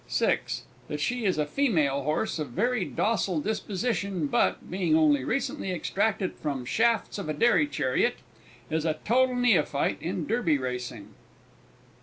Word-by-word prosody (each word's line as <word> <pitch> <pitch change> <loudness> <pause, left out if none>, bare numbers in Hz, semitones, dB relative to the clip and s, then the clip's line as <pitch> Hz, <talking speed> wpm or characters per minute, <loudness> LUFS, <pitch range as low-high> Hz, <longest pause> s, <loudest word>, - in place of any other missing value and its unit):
(6.) - - 0 0.2
That 150 - -4
she 240 +9 -1
is 185 -4 +2
a 150 - +1
female 150 - +1
horse 155 +6 -1
of 150 - -2
very 230 - 0
docile 195 -6 0
disposition, 200 -2 -2
but, 95 -9 +1
being 175 -4 +1
only 145 -4 +4
recently 260 - -2
extracted 195 +2 -1
from 135 -4 -3
shafts 225 - +1
of 155 -6 -4
dairy 240 - +4
chariot, - - 0 0.6
is 160 0 0
a 160 -1 0
total 255 +2 +3
neophyte 195 - +2
in 175 -1 -3
Derby 200 -9 +1
racing. 125 -4 -5
180 Hz, 140 wpm, -27 LUFS, 150-230 Hz, 0.6 s, only